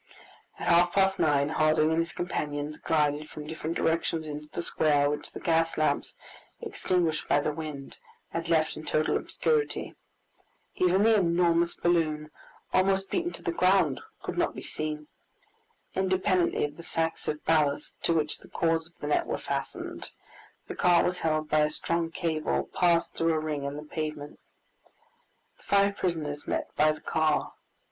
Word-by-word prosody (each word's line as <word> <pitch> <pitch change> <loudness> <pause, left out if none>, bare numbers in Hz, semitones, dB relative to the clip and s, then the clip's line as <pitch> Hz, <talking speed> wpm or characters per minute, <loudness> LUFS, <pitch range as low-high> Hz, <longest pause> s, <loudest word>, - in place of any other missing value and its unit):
At - - -5
half 175 +1 +5
past 195 -1 +3
nine, 145 -2 +3
Harding 155 0 +3
and 160 - +2
his 165 0 -1
companions 150 -4 -3
glided 150 -1 0
from 150 - -8
different 160 +1 -4
directions 165 -1 0
into 150 0 -7
the 170 - -4
square, 145 -3 +2
which 150 - -5
the - - -8
gas 165 -1 +1
lamps, 150 -2 0 0.4
extinguished 165 -7 -1
by - - +4
the 150 - 0
wind, 150 -3 -7 0.3
had 165 0 -4
left 160 -2 +2
in 155 - -8
total 155 0 +1
obscurity. 455 -2 -1 0.8
Even 185 +2 +3
the 225 +1 +5
enormous 170 -2 +2
balloon, 155 -3 0 0.4
almost 195 +1 +2
beaten 345 -1 0
to - - -9
the - - 0
ground, 180 -5 +3 0.2
could - - -3
not - - +1
be - - -7
seen. 150 -1 -4 0.9
Independently 185 -2 +1
of 145 0 -7
the - - -8
sacks 165 -1 -2
of 150 0 -3
ballast, 150 -2 +1
to - - +1
which 155 -2 0
the - - -16
cords 165 -1 0
of 170 - -24
the - - -4
net 150 - +1
were - - -1
fastened, - - -4 0.6
the - - -5
car 175 -1 +4
was 180 0 0
held 155 -1 0
by 155 - +2
a 150 0 +3
strong 170 +2 -1
cable 165 -2 -1
passed 170 -2 +2
through 165 0 +1
a 155 - +1
ring 150 -2 -3
in 140 +1 -3
the 150 - -6
pavement. 150 -1 -5 1.2
The - - -24
five 200 0 +3
prisoners 155 -6 -3
met - - -3
by 155 +1 +4
the 155 - -7
car. 155 -1 0
160 Hz, 170 wpm, -28 LUFS, 150-175 Hz, 1.2 s, half